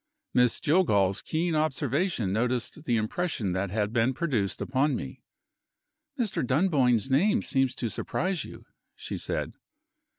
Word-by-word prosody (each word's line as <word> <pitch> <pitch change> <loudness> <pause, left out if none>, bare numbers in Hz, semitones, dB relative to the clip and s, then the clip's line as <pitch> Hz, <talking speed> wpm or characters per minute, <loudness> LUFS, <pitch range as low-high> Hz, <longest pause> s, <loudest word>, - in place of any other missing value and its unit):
Miss 125 -2 +3
Jillgall's 105 - +2
keen 165 +1 -1
observation 155 - 0
noticed 125 +6 -1
the 120 -2 +2
impression 110 - -1
that 95 +2 -1
had 105 +2 -1
been 120 +2 +2
produced 120 - -1
upon 135 +2 +1
me. 65 - -6 1.0
"Mr. 230 -6 0
Dunboyne's 130 - +2
name 205 - +3
seems 135 -2 +1
to 120 - -2
surprise 180 - -2
you." - - -11 0.3
she - - -6
said. - - -3
130 Hz, 130 wpm, -28 LUFS, 110-160 Hz, 1.0 s, Miss